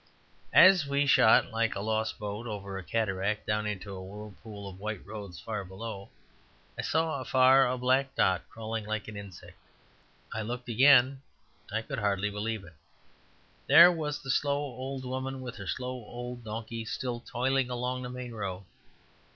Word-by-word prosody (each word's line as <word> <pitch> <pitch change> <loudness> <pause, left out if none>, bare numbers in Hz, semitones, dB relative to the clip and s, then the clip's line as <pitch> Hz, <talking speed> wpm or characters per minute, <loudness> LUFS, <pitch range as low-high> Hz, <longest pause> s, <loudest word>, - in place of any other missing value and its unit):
As 185 -6 +8
we 140 +1 +2
shot 125 -3 +5
like 115 0 0
a - - -3
lost 110 +1 -1
boat 105 +3 -5
over 100 -3 -5
a 95 - -5
cataract 100 +1 -1
down 105 0 0
into 100 -1 -5
a 95 - -7
whirlpool 105 +1 -9
of 95 -1 -10
white 105 -1 -5
roads 100 -5 -8
far 105 -3 -4
below, 100 +1 -7 0.7
I - - -3
saw 160 -3 0
afar 130 +1 +5
a 125 +1 -1
black 130 +2 +1
dot 95 -1 +3
crawling 110 0 -5
like 110 -1 -3
an 110 - -8
insect. 100 -3 -10 0.7
I 110 - -2
looked 120 +3 -5
again: 130 +2 +5 0.5
I 110 +2 -1
could 140 -1 -4
hardly 105 0 0
believe 105 0 -3
it. 90 -2 -14 0.9
There 170 +5 +9
was 150 -4 -3
the 135 - -1
slow 140 +1 +1
old 135 -1 -5
woman, 130 +1 -4
with 125 -3 -7
her 100 -3 -8
slow 125 +4 -3
old 120 +2 -7
donkey, 115 +1 -5
still 120 +1 -3
toiling 130 +2 0
along 125 +1 -2
the 125 - -5
main 125 -1 -6
road. 100 -4 -5
115 Hz, 165 wpm, -29 LUFS, 105-130 Hz, 0.9 s, There